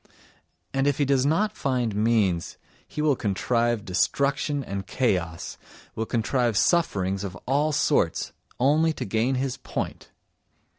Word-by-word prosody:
And 135 +1 +1
if 145 - +2
he 145 - +2
does 135 0 +2
not 210 +8 +1
find 125 - -1
means 105 -6 +1 0.3
he 150 - -4
will 150 -3 +3
contrive 115 +1 0
destruction 140 - 0
and 100 -4 -5
chaos, 90 -10 -1 0.3
will 110 0 -3
contrive 120 -1 +1
sufferings 100 - +1
of 95 -3 -5
all 145 +4 +2
sorts, 145 - +1 0.3
only 155 +5 +3
to - - -5
gain 115 +6 +1
his 130 0 -2
point! - - -5
125 Hz, 135 wpm, -25 LUFS, 105-140 Hz, 0.3 s, will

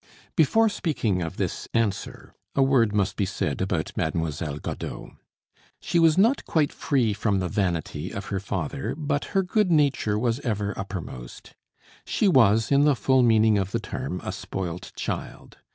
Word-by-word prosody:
Before 225 +9 +4
speaking 140 - -1
of 80 -1 -4
this - - -3
answer, 105 -4 -2 0.2
a 135 - +4
word 130 -5 +3
must 100 -1 0
be 100 - 0
said 85 -6 -2
about 90 -4 -2
Mademoiselle 80 -2 -2
Godeau. - - -6 0.7
She 170 - 0
was 165 -1 +5
not 230 +8 +4
quite 155 -3 +1
free 125 -7 +1
from 100 0 0
the 90 -1 -1
vanity 85 -3 -2
of 100 - -6
her 95 - 0
father, 100 - -3
but 145 -2 -1
her 195 - +4
good 205 +1 +1
nature 140 -9 +2
was 120 +2 0
ever 105 -6 -2
uppermost. 90 -11 -7 0.5
She 210 - +1
was, 115 - +4
in 140 +1 +5
the 145 -2 +4
full 130 +3 +3
meaning 110 -3 +4
of 95 -1 -1
the - - -1
term, - - -5
a - - -3
spoilt 90 -2 -5
child. - - -6
110 Hz, 165 wpm, -25 LUFS, 95-140 Hz, 0.7 s, was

